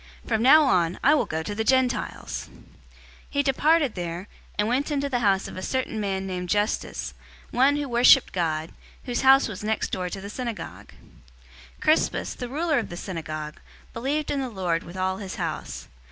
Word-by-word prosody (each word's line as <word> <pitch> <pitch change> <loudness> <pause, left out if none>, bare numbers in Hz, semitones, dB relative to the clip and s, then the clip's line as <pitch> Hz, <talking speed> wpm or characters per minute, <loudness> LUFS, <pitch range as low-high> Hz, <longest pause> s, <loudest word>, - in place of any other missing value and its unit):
From 215 - 0
now 295 +6 +7
on, 180 - +2
I 285 - +6
will 305 - +2
go 160 0 -2
to 205 - -4
the 220 +2 -1
Gentiles!" 260 +1 0
018:007 - - -17 0.7
He 285 0 +1
departed 290 0 +3
there, 175 +1 -5 0.3
and 210 - +1
went 260 +6 0
into 285 -1 -1
the 250 -3 0
house 195 -4 +2
of - - -9
a - - -4
certain 260 -1 -2
man 195 -2 -2
named 180 -2 -4
Justus, 210 +2 -1 0.4
one 270 +4 +4
who 290 -1 -2
worshiped 245 +2 +5
God, 160 -3 -1 0.3
whose 245 -1 -2
house 270 +1 +6
was 210 -3 -7
next 215 0 -1
door 180 -1 -2
to 195 - -5
the 195 - -7
synagogue. 235 -2 -6 0.8
018:008 - - -26
Crispus, 310 +1 +2
the 245 -2 -6
ruler 310 +2 +1
of 230 - -5
the 175 - -7
synagogue, 155 -5 -5 0.3
believed 280 +6 -1
in 280 - 0
the 260 - -3
Lord 180 -6 -1
with 175 +2 -10
all 185 0 0
his 195 -2 -6
house. - - -4
220 Hz, 190 wpm, -25 LUFS, 185-270 Hz, 0.8 s, now